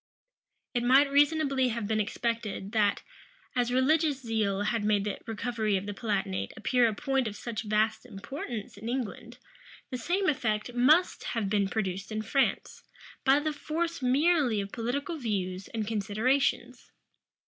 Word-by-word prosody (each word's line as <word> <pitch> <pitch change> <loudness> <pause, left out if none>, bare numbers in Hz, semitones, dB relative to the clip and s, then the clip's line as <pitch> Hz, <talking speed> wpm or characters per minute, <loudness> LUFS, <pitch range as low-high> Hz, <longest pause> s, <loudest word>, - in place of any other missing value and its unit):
It 240 - +1
might 270 +4 +5
reasonably 285 -2 +3
have 235 -2 -2
been 220 0 0
expected, 215 -2 -2
that, 210 -3 +2 0.5
as 245 -1 +1
religious 290 +3 +2
zeal 215 -5 -1
had 220 +1 0
made 205 -1 +2
the 205 -1 -3
recovery 225 -2 -1
of 190 - -5
the 205 - -4
Palatinate 190 - -2
appear 245 +2 +3
a 220 - -1
point 270 +1 0
of 210 - -5
such 225 0 -4
vast 215 +2 0
importance 225 0 -6
in 220 +3 -6
England, 240 -1 -4 0.5
the 255 - -3
same 370 +9 0
effect 225 -5 0
must 300 +9 +4
have 215 -4 -2
been 200 -2 +2
produced 195 -2 -3
in 215 0 -2
France, 270 +5 0 0.4
by 270 +1 +5
the 305 +1 -2
force 330 +2 -3
merely 270 -2 +3
of 200 0 -4
political 280 +8 -3
views 195 -6 -2
and 220 -2 -3
considerations. 225 +6 0
230 Hz, 150 wpm, -29 LUFS, 210-270 Hz, 0.5 s, might